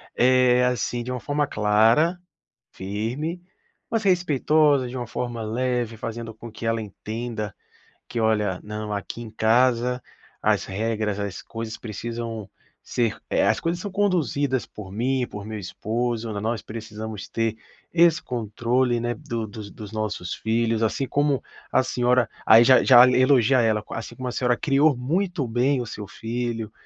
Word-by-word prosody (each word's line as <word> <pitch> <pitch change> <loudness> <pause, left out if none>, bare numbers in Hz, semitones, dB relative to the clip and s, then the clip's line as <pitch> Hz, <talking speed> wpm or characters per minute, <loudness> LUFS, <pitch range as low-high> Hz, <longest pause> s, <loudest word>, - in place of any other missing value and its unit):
Eh, 125 0 +4
assim, 120 -1 -1
de 125 - -5
uma 125 - -3
forma 145 +3 0
clara, 115 +11 +3 0.6
firme, 120 - -3 0.5
mas 225 -1 0
respeitosa, 150 -6 +3
de 130 - -6
uma 120 -2 -4
forma 120 -1 -4
leve, 120 0 -1
fazendo 115 0 -6
com 115 +1 -10
que 110 +1 -8
ela 115 0 +1
entenda 110 +1 -5 0.5
que: 120 - -3
"Olha, 105 -4 +1
não, 105 0 -5
aqui 105 +3 -4
em 115 - -7
casa, 120 +2 +2 0.4
as - - +2
regras, 105 0 -2
as 100 -2 -4
coisas 115 -1 -6
precisam 115 -2 -5 0.3
ser 115 -2 -1
eh, - - +2
as - - +2
coisas 170 +1 -1
são 205 0 -5
conduzidas 155 - +1
por 95 -3 -10
mim, 125 +4 0
por 105 0 -7
meu 110 -1 -5
esposo, 115 +4 -2
n 100 - -3
nós 115 0 -2
precisamos 110 -1 -7
ter 115 -1 -1 0.4
esse 170 -1 +4
controle, 120 +2 0
né, 120 +1 -1
do 120 -7 -4
dos 105 -1 -9
dos 105 -1 -10
nossos 105 -4 -3
filhos, 115 0 0
assim 115 +4 0
como 145 -2 +1 0.3
a - - +4
senhora" 125 -1 +2 0.2
Aí, 115 +2 +8
já 130 +1 +6
já 125 -1 +8
elogia 130 -1 +4
ela: 110 -2 +1
"Assim 115 - -6
como 130 -1 -5
a - - -2
senhora 125 -1 +1
criou 145 -2 +3
muito 165 +3 -1
bem 125 +4 +1
o 120 - -3
seu 105 -2 -7
filho 115 -1 -4
120 Hz, 160 wpm, -24 LUFS, 110-130 Hz, 0.6 s, Aí